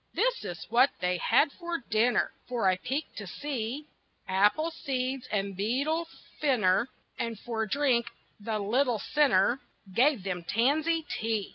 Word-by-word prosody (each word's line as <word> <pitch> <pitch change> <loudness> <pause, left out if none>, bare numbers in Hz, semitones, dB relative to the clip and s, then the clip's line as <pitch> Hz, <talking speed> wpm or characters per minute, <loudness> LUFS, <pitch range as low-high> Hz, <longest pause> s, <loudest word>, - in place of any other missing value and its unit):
This - - +1
is 175 - -6
what 250 +4 +6
they 180 0 0
had 255 +9 +3
for 345 +1 -4
dinner, 235 -3 +1 0.2
For 240 -5 0
I 185 -1 +3
peeked 275 +10 -4
to 205 -2 -6
see: 270 - -4 0.4
Apple 210 - +3
seeds 260 -4 -3
and 200 -2 -1
beetle 275 - 0 0.3
finner, 240 -5 +2 0.3
And 230 -1 -2
for 220 -1 -3
drink 250 -2 +2 0.3
the 215 +1 -2
little 235 +4 +1
sinner 245 -1 +3 0.3
Gave 255 -1 +3
them 180 -3 -3
tansy 300 - +1
tea. 220 -5 -2
240 Hz, 140 wpm, -29 LUFS, 205-285 Hz, 0.4 s, what